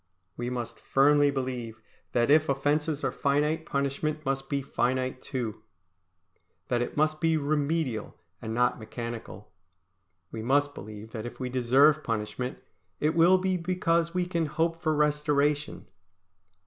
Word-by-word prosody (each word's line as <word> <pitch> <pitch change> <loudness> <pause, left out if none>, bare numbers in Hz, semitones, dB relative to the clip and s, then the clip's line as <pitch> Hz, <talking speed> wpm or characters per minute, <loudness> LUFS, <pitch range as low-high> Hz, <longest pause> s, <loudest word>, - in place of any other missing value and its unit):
We 120 0 -3
must 120 -2 -5
firmly 145 +1 +4
believe 125 -5 -4 0.3
that 120 +2 +3
if 155 0 +5
offences 145 +2 0
are 135 - +1
finite, 150 +4 0
punishment 145 +2 -2
must 135 0 -2
be 140 -1 -1
finite 130 -1 -1
too; 120 -6 -4 1.1
that 120 -1 +1
it 120 - -4
must 155 0 +1
be 165 -1 +3
remedial 145 -5 -1 0.3
and 110 - -5
not 125 +2 +1
mechanical. 115 -2 -7 0.8
We 110 - -5
must 145 +4 +2
believe 110 0 -9
that 110 0 -5
if - - -10
we 130 -1 -3
deserve 135 +5 +4
punishment, 115 +3 -3 0.4
it 150 +1 +1
will 170 +3 +6
be 185 0 0
because 170 -1 +1
we 180 0 0
can 170 -3 -1
hope 165 +3 -1
for 155 -2 +1
restoration. 150 0 +1
140 Hz, 140 wpm, -28 LUFS, 125-155 Hz, 1.1 s, will